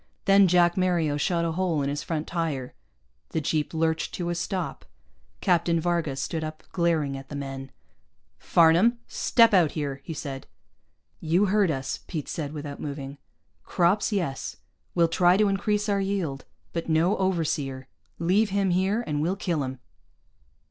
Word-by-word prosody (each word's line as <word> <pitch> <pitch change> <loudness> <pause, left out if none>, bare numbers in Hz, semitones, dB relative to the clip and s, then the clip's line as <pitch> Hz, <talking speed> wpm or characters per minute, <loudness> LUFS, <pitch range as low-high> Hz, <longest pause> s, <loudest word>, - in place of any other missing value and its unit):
Then 195 0 +6
Jack 175 0 +4
Mario 175 -5 +1
shot 170 +3 0
a 165 - 0
hole 165 -4 0
in 140 - -1
his 145 +1 -2
front 160 -2 -3
tire. 155 -7 -3 0.6
The - - -1
jeep 155 0 -1
lurched 160 0 -1
to 175 -1 -2
a - - 0
stop. 175 +1 -3 0.6
Captain 170 -1 +2
Varga 170 -4 0
stood 155 +4 -3
up, 155 0 -6
glaring 165 -6 +1
at 135 0 -9
the 145 - -6
men. 135 -1 -6 0.7
"Farnam, 175 +9 +4
step 230 -3 +3
out 175 -6 +4
here," 140 -3 -3
he 160 - -6
said. 135 -2 -6 0.7
"You 170 +5 +2
heard 200 -1 +3
us," 135 -3 -2
Pete 155 -5 -4
said, 145 -3 -4
without 145 -2 -7
moving. 140 -1 -6 0.4
"Crops, 185 +5 +1
yes. 175 -10 -2 0.4
We'll 170 -1 +4
try 175 +2 +4
to 210 0 +4
increase 205 +2 0
our 200 -1 +1
yield. 185 -9 -2 0.3
But 170 0 -3
no 165 +5 +3
overseer. 150 -8 -1 0.3
Leave 195 +6 +2
him 195 -1 +1
here 190 +6 +1
and 150 -1 -1
we'll 175 +5 0
kill 175 -6 -1
him." 130 -1 -4
165 Hz, 160 wpm, -26 LUFS, 145-185 Hz, 0.7 s, Then